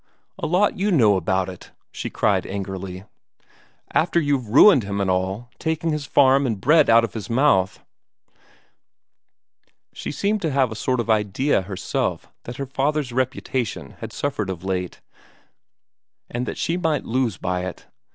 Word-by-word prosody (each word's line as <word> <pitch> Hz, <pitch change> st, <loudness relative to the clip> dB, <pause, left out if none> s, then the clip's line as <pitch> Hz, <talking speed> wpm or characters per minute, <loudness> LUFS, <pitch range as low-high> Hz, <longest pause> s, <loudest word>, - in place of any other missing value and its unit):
"A -, -, -2 dB
lot 180 Hz, +4 st, +2 dB
you 205 Hz, +2 st, +1 dB
know 110 Hz, -, +5 dB
about 95 Hz, +1 st, 0 dB
it!" 90 Hz, -1 st, -10 dB, 0.2 s
she -, -, -5 dB
cried -, -, +1 dB
angrily. 95 Hz, -1 st, -5 dB, 0.9 s
"After 170 Hz, +1 st, +2 dB
you've 140 Hz, -7 st, 0 dB
ruined 140 Hz, -, +7 dB
him 100 Hz, -1 st, -4 dB
and 95 Hz, -2 st, +1 dB
all, 95 Hz, +6 st, -2 dB
taking 160 Hz, +1 st, -1 dB
his 150 Hz, -2 st, -3 dB
farm 135 Hz, 0 st, +4 dB
and 115 Hz, -, 0 dB
the -, -, -13 dB
bread 150 Hz, -, +4 dB
out 115 Hz, 0 st, +6 dB
of 115 Hz, -, -3 dB
his 110 Hz, -1 st, -6 dB
mouth." 115 Hz, -7 st, +2 dB, 2.1 s
She -, -, -5 dB
seemed 205 Hz, +7 st, -1 dB
to 160 Hz, -, 0 dB
have 135 Hz, -4 st, +1 dB
a -, -, -5 dB
sort 125 Hz, +3 st, -1 dB
of 115 Hz, -1 st, 0 dB
idea 110 Hz, +5 st, +1 dB
herself 95 Hz, -1 st, -3 dB
that 120 Hz, -, -7 dB
her 140 Hz, -, -3 dB
father's 135 Hz, 0 st, -1 dB
reputation 130 Hz, -2 st, -2 dB
had -, -, -7 dB
suffered 110 Hz, -9 st, -3 dB
of 90 Hz, -2 st, -5 dB
late, 90 Hz, -2 st, -3 dB, 1.3 s
and 120 Hz, +1 st, -3 dB
that -, -, -4 dB
she 170 Hz, -, -1 dB
might 160 Hz, -5 st, 0 dB
lose 120 Hz, -4 st, 0 dB
by 90 Hz, 0 st, -2 dB
it. 95 Hz, -, -8 dB
120 Hz, 160 wpm, -22 LUFS, 95-145 Hz, 2.1 s, ruined